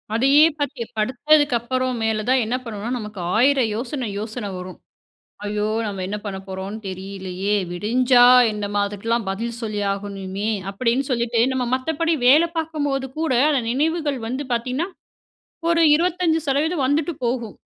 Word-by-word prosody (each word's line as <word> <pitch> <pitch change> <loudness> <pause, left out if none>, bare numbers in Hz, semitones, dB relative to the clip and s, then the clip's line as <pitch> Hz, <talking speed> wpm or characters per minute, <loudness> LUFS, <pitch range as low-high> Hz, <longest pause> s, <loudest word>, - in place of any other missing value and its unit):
அதையே 275 +6 +6
பாத்து 285 -4 -3
படுத்ததுக்கு 260 +5 +3
அப்பறம், 255 +1 -2
மேல 220 -1 0
தான் 260 0 +4
என்ன 235 +3 -1
பண்ணுவோனா? 220 -2 -5
நமக்கு 210 -2 -8 0.2
ஆயிரம் 255 0 +3
யோசனை 245 +2 -3
யோசன 215 0 -5
வரும். 180 0 -8 0.7
ஐயோ! 210 0 -1 0.2
நம்ம 200 -2 -4
என்ன 205 +2 -3
பண்ண 195 -2 -4
போறோன்னு 190 +3 -5
தெரியலையே? 190 +1 -3 0.2
விடிஞ்சா 245 +6 +4 0.3
நாம 205 -1 -2
அதுக்குல்லாம் 220 +2 -2
பதில் 230 +4 -4
சொல்லி 215 -2 -3
ஆகணுமே 200 0 -4 0.2
அப்டின்னு 235 +6 0
சொல்லிட்டு, 235 -1 +1
நம்ம 260 -1 -1
மத்தபடி 320 +5 0
வேல 300 +6 +7
பாக்கும்போது 290 -4 -2
கூட, 320 -4 0 0.2
அந்த 280 -4 +2
நினைவுகள் 295 +1 0
வந்து 260 +5 -3
பாத்தீங்கனா, 255 +8 -1 0.8
ஒரு 335 0 +3
25% 320 -3 +1
வந்துட்டு 290 +5 +1
போகும். 235 -3 -2
240 Hz, 135 wpm, -22 LUFS, 210-285 Hz, 0.8 s, வேல